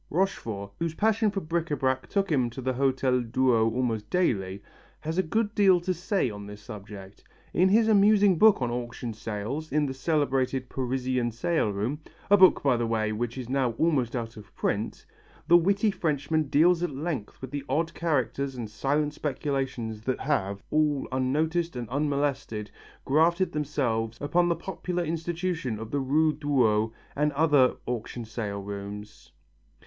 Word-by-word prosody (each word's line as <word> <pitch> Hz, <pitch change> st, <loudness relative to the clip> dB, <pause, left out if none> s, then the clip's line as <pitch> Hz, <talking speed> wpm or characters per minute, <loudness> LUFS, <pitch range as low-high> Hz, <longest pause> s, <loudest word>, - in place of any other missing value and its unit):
Rochefort, 115 Hz, -, -2 dB
whose 165 Hz, -1 st, -2 dB
passion 220 Hz, +2 st, +2 dB
for 200 Hz, -1 st, -3 dB
bric 170 Hz, +1 st, -2 dB
à 145 Hz, -, -1 dB
brac 130 Hz, 0 st, 0 dB
took 195 Hz, -3 st, 0 dB
him 130 Hz, -5 st, +2 dB
to 120 Hz, -, -9 dB
the 130 Hz, +1 st, 0 dB
Hotel 130 Hz, -1 st, +1 dB
Drouot 115 Hz, -1 st, +2 dB
almost 115 Hz, -3 st, -2 dB
daily, 100 Hz, -, 0 dB, 0.4 s
has 160 Hz, +4 st, -2 dB
a -, -, +6 dB
good 210 Hz, +5 st, -1 dB
deal 195 Hz, -4 st, +5 dB
to 185 Hz, +2 st, -1 dB
say 180 Hz, 0 st, 0 dB
on 100 Hz, -1 st, -8 dB
this 105 Hz, 0 st, -10 dB
subject. 100 Hz, -3 st, -10 dB, 0.3 s
In 185 Hz, +2 st, +4 dB
his 220 Hz, +3 st, +4 dB
amusing 205 Hz, -3 st, +5 dB
book 215 Hz, -11 st, +6 dB
on 120 Hz, -, -1 dB
auction 120 Hz, -1 st, -4 dB
sales 110 Hz, +8 st, -5 dB
in 150 Hz, 0 st, +2 dB
the 135 Hz, -, -3 dB
celebrated 135 Hz, -3 st, 0 dB
Parisian 130 Hz, -1 st, -1 dB
sale 120 Hz, +2 st, 0 dB
room 110 Hz, +9 st, -2 dB, 0.3 s
a 205 Hz, -, +8 dB
book, 185 Hz, -1 st, +6 dB
by 135 Hz, -4 st, +3 dB
the 115 Hz, 0 st, -1 dB
way, 110 Hz, -1 st, 0 dB
which 115 Hz, +3 st, -3 dB
is 125 Hz, -3 st, -5 dB
now 130 Hz, -2 st, 0 dB
almost 130 Hz, -3 st, +1 dB
out 115 Hz, -2 st, -4 dB
of 105 Hz, -1 st, -13 dB
print 105 Hz, +2 st, -2 dB, 0.4 s
the 175 Hz, -, +6 dB
witty 200 Hz, +5 st, +3 dB
Frenchman 155 Hz, -3 st, -1 dB
deals 170 Hz, +4 st, +4 dB
at 175 Hz, -, 0 dB
length 145 Hz, -5 st, -4 dB
with 130 Hz, -1 st, -8 dB
the 145 Hz, -1 st, -4 dB
odd 160 Hz, +5 st, 0 dB
characters 140 Hz, -4 st, -1 dB
and 115 Hz, -4 st, -6 dB
silent 145 Hz, +6 st, 0 dB
speculations 135 Hz, -7 st, -3 dB
that 130 Hz, -, -1 dB
have, 100 Hz, -9 st, -1 dB
all 150 Hz, -2 st, +1 dB
unnoticed 155 Hz, +6 st, 0 dB
and 120 Hz, -2 st, -4 dB
unmolested, 140 Hz, -6 st, -1 dB, 0.3 s
grafted 170 Hz, +6 st, +3 dB
themselves 120 Hz, -7 st, -1 dB
upon 175 Hz, +4 st, +2 dB
the 170 Hz, -, +2 dB
popular 180 Hz, -1 st, -3 dB
institution 165 Hz, -5 st, -2 dB
of 110 Hz, +1 st, -7 dB
the 145 Hz, -, 0 dB
Rue 150 Hz, +4 st, +2 dB
Drouot 115 Hz, -8 st, +2 dB, 0.2 s
and 150 Hz, +1 st, +1 dB
other 145 Hz, -3 st, +4 dB
auction 120 Hz, 0 st, -4 dB
sale 105 Hz, -2 st, -4 dB
rooms. 100 Hz, +1 st, -8 dB
135 Hz, 165 wpm, -27 LUFS, 115-165 Hz, 0.4 s, a